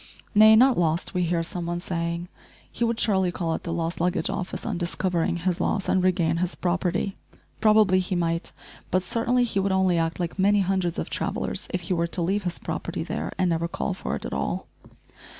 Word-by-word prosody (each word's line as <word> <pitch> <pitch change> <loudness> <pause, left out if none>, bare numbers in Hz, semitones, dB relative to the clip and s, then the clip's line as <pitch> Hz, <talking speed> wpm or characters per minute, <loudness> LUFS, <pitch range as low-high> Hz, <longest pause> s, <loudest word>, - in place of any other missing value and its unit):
"Nay, 215 +1 +8
not 250 0 +5
lost," 165 +2 0
we 180 - 0
hear 170 -1 +1
some 170 +1 -4
one 175 0 -2
saying; 170 0 -3 0.4
"he 235 - -2
would 230 0 +1
surely 190 -4 +2
call 170 -2 -2
at - - -3
the 170 - -5
lost 165 0 -2
luggage 180 +2 0
office 185 -2 -4
on 210 -7 -2
discovering 175 -1 0
his 175 0 -1
loss 195 -2 0
and 185 - +2
regain 170 -3 +2
his 180 +1 -1
property." 180 +2 -1 0.4
Probably 215 -3 +5
he 185 0 -1
might, 165 -1 -1 0.4
but 185 0 +1
certainly 240 +5 +1
he 225 -5 0
would 195 0 +1
only 190 -2 +3
act 165 +1 -1
like 175 +2 -3
many 200 +1 +4
hundreds 185 -2 0
of - - -4
travellers - - -2
if 180 - -2
he 175 +2 -2
were 170 -1 +1
to 175 +1 -3
leave 195 +3 0
his 175 - -2
property - - -4
there - - -4
and 185 - +2
never 165 0 0
call 185 - -2
for 185 - -4
it - - -7
at - - -4
all. - - -2
180 Hz, 210 wpm, -25 LUFS, 170-195 Hz, 0.4 s, Nay